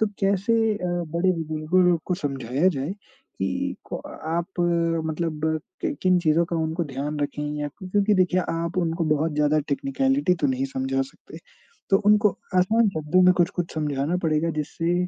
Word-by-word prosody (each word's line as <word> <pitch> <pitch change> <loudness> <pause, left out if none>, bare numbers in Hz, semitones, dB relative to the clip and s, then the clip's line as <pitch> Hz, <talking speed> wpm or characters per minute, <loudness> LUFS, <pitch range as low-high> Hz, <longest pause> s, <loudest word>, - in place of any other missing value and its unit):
तो 220 - +4
कैसे 200 +3 +2 0.2
अ, 180 -3 -4
बड़े 175 +1 0
बुजुर्गों 160 +2 0
लोग 170 -2 +2
को 180 - +1
समझाया 135 0 0
जाए, 145 -1 -2 0.5
कि - - -1 0.2
क - - 0
अ, - - -9 0.2
आप 170 +3 -2 0.5
मतलब 160 -1 -3 0.4
कि - - -1
किन 185 -1 +4
चीज़ों 165 0 +3
का 170 - -2
उनको 160 +1 -1
ध्यान 145 +2 -4
रखें 145 +1 -2 0.2
या 145 - -2
क्यों 185 +6 -11
क्योंकि 205 +1 +3
देखिए 185 -1 +3
आप 165 +1 -3
उनको 165 -1 0
बहुत 160 +2 -1
ज़्यादा 150 +1 +2
टेक्निकैलिटी 270 - +1
तो 145 - +3
नहीं 130 0 0
समझा 135 0 -1
सकते। 135 +4 -12 0.5
तो 195 - +6
उनको 210 0 +5 0.3
आसान 220 +5 +3
शब्दों 160 +1 +2
में 185 - +7
कुछ-कुछ 175 0 0
समझाना 150 +1 -1
पड़ेगा 160 +1 +1
जिससे 165 +3 -2
165 Hz, 170 wpm, -24 LUFS, 150-185 Hz, 0.5 s, में